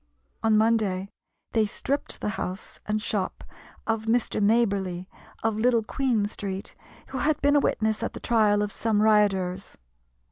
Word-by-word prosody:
On 220 -1 +4
Monday 215 -4 +2 0.4
they 220 -3 +2
stripped 280 +7 -3
the - - -1
house 190 -1 -5
and 210 0 +1
shop 210 -3 -2 0.4
of 225 -1 -1
Mr. 225 -1 +1
Maberly, 200 -5 +1 0.4
of 220 -1 +1
Little 230 0 +3
Queen 235 -2 0
Street, 200 -1 -5 0.4
who 265 - -4
had 300 +1 +1
been 285 +1 +4
a - - +6
witness 220 -5 0
at - - -2
the - - -7
trial 210 -3 +3
of 210 - -3
some 215 -2 +1
rioters. 195 -3 +2
215 Hz, 150 wpm, -26 LUFS, 205-230 Hz, 0.4 s, a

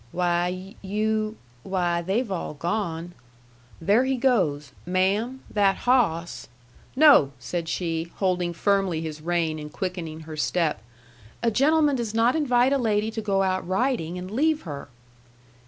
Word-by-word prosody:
"Why, 180 +2 -1
you 215 +2 -1 0.2
why, 175 -1 0
they've 200 +6 -1
all 170 -4 -4
gone. 170 0 -3 0.7
There 205 +9 +3
he 265 0 0
goes. 180 - +1
Ma'am 200 +8 0
that 200 -2 +3
hawss 175 -10 +1 0.2
" - - -28
"No," 275 - +6
said 165 +6 -4
she, 165 -1 -2
holding 180 -3 0
firmly 190 -2 +1
his 155 -1 -6
rein 165 -1 -1
and 150 0 -8
quickening 165 -2 -5
her 155 0 -8
step. 155 - 0 0.6
"A 230 - +3
gentleman 290 +3 +3
does 225 -3 -3
not 230 +4 +3
invite 255 -3 +3
a 280 - +2
lady 220 -2 +1
to 225 - -4
go 195 -2 +1
out 185 -1 -1
riding 185 -4 0
and 180 +1 -7
leave 310 +6 +1
her." 145 -5 -7
190 Hz, 145 wpm, -25 LUFS, 170-225 Hz, 0.7 s, No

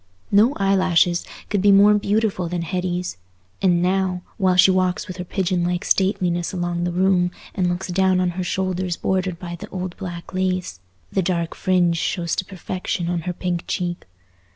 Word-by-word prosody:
No 215 +6 +5
eyelashes 185 -3 +2 0.2
could 205 -3 +1
be 205 +1 +5
more 200 +1 +7
beautiful 205 -3 0
than 175 -1 -2
Hetty's; 180 - -2 0.4
and 175 -2 +3
now, 185 -1 0
while 185 -3 +2
she 185 +1 +6
walks 185 0 0
with 185 -2 -7
her 180 - -4
pigeon 180 -1 -1
like 175 +2 -1
stateliness 180 -3 +1
along 175 -1 -2
the 175 - -1
room 180 0 +2 0.2
and 180 -3 0
looks 180 +2 -3
down 185 +1 +2
on 180 -1 +1
her 185 +1 -3
shoulders 185 -1 -1
bordered 185 -2 -1
by 175 -1 -7
the - - -9
old 185 -1 -5
black 175 -3 -7
lace, 185 - -1 0.3
the 190 - +1
dark 170 -2 -1
fringe 180 -3 +2
shows 170 0 -1
to 185 - -1
perfection 185 -2 -4
on 175 -1 -1
her - - -1
pink 175 -1 -3
cheek. 175 - -3
180 Hz, 175 wpm, -22 LUFS, 175-190 Hz, 0.4 s, more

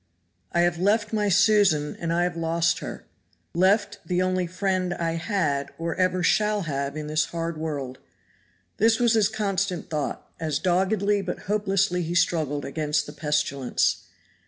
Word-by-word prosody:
"I 170 - +2
have 175 -1 +1
left 210 +3 +1
my 210 -1 +1
Susan 190 -6 +3
and 165 -1 -2
I 170 +1 +2
have 175 -1 -1
lost 165 +1 +1
her - - -7 0.5
left 200 +4 +2
the 180 -1 -1
only 185 -1 +1
friend 185 0 -1
I 165 -1 -1
had 165 -5 -1
or 165 0 -2
ever 185 0 +1
shall 210 +3 +2
have 140 -2 -3
in 155 - -4
this 155 +1 +1
hard 165 +1 -4
world." 145 -5 -4 0.8
This 225 +2 +3
was 240 -1 +3
his 215 -2 +3
constant 195 -5 -2
thought, 150 -2 -3
as 155 -3 -1
doggedly 195 +4 +1
but 180 -2 -5
hopelessly 195 -3 0
he 170 +1 -3
struggled 155 -4 +1
against 150 0 -1
the - - -9
pestilence. 145 -4 0
175 Hz, 155 wpm, -25 LUFS, 155-195 Hz, 0.8 s, Susan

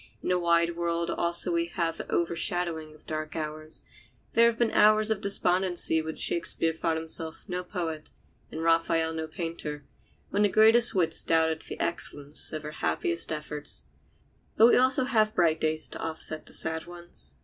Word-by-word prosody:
In - - -2
the 180 0 +2
wide 170 0 +2
world 170 0 -1
also 170 +1 +1
we 170 0 0
have 170 -2 -2
the - - -7
overshadowing 170 -2 0
of 155 - -21
dark 155 0 -5
hours. 155 0 -5 0.5
There 235 0 +5
were 235 0 0
hours 215 +1 +5
of 210 -2 -1
despondency 180 -4 +2
when 160 0 -6
Shakespeare 165 -1 -1
thought 160 0 -1
himself 160 0 -5
no 180 -1 -3
poet 165 -4 -5 0.4
and 160 - -5
Raphael 165 0 +2
no 160 0 -4
painter, 160 -3 -6 0.5
when 205 - +1
the 205 - +4
greatest 225 +3 +5
wits 165 -3 +2
doubted 160 -1 +1
the - - -9
excellence 145 -3 -1
of 155 -1 -5
their 150 - -6
happiest 85 - -1
efforts. 150 -1 -4 0.7
But 225 +2 +7
we - - +4
have 255 - +6
also 260 0 +3 0.3
bright 165 -2 +2
days 155 0 0
to - - -7
offset 160 -1 -3
the - - -3
sad 160 +1 -1
ones. 175 - -7
165 Hz, 170 wpm, -27 LUFS, 155-180 Hz, 0.7 s, But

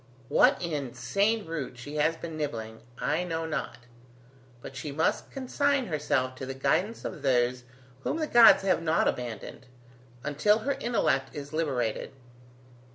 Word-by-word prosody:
What - - +5
insane 155 - -1
root 155 -6 -5
she 145 +5 -7
has 160 +2 +2
been 165 -1 -7
nibbling, 115 -7 -4 0.2
I 165 +4 0
know 165 -2 -3
not, 155 -3 -3 0.8
but 135 - -10
she 145 +2 -5
must 155 +3 0
consign 275 +1 0
herself 145 - 0
to 130 - -5
the 135 - -5
guidance 185 +11 0
of - - -5
those 125 -2 +1 0.3
whom 135 - -2
the 315 - 0
gods 235 -7 +7
have 185 -3 +2
not 165 0 +2
abandoned, 125 +1 -4 0.6
until 150 +9 +3
her 280 - +2
intellect 135 - 0
is 145 0 -7
liberated. 135 -10 -1
150 Hz, 145 wpm, -28 LUFS, 130-185 Hz, 0.8 s, gods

